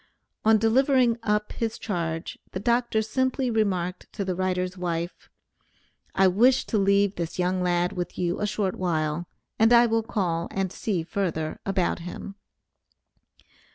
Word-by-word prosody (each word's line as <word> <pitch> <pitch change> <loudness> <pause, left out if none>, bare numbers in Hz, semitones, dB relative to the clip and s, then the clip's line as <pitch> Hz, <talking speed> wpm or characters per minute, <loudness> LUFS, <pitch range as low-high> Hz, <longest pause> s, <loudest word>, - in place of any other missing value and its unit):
On 220 0 +5
delivering 245 +1 +3
up 210 -1 0
his 225 -1 -3
charge, 165 -4 -3
the 185 - -3
Dr. 235 0 +1
simply 260 +3 0
remarked 185 -5 -1
to 200 - -3
the 185 - -1
writer's 185 0 -1
wife, 175 -1 -4 0.9
"I 190 0 +5
wish 240 +8 +4
to 215 - 0
leave 200 0 +3
this 170 -2 -4
young 180 +1 0
lad 175 0 +1
with 180 -1 -4
you 175 -1 -1
a 210 - +1
short 195 -2 -1
while, 165 -2 -1 0.3
and 225 +1 +5
I 240 0 +7
will 225 -1 +1
call 180 -7 -1
and 190 -2 -2
see 190 -6 -2
further 160 -3 -2
about 190 -3 0
him." 175 +3 -7
195 Hz, 150 wpm, -26 LUFS, 175-220 Hz, 0.9 s, I